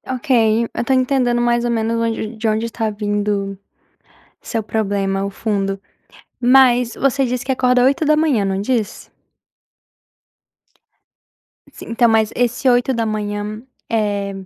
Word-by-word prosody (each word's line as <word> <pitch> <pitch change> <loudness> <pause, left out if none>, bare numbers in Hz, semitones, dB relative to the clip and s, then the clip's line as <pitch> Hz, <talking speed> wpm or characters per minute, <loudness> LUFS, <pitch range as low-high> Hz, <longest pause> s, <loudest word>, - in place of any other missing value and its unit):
.Ok, 255 +4 -10 0.5
eu - - -1
tô 265 - +1
entendendo 255 -2 +1
mais 240 0 +1
ou 240 - 0
menos 225 0 -1
onde 225 -1 -2
de 225 +1 -3
onde 220 +1 0
está 225 -1 -3
vindo 205 -1 -2 0.8
seu 225 -2 -3
problema, 200 -2 -1
o - - -4
fundo. 195 -2 -2 0.6
Mas 250 -1 +4
você 275 0 +1
disse 250 0 -2
que 265 - -1
acorda 250 -1 +2
8 280 +4 +2
da 305 +1 +4
manhã, 290 -10 +2
não 195 0 -1
disse? 220 -2 -2 2.6
Sim, - - -12
então, 230 0 +3
mas 220 -1 +2
esse 245 +2 0
8 245 +1 +2
da 230 -1 -1
manhã, 210 0 -4 0.3
eh 205 -3 -1
230 Hz, 140 wpm, -18 LUFS, 205-245 Hz, 2.6 s, Mas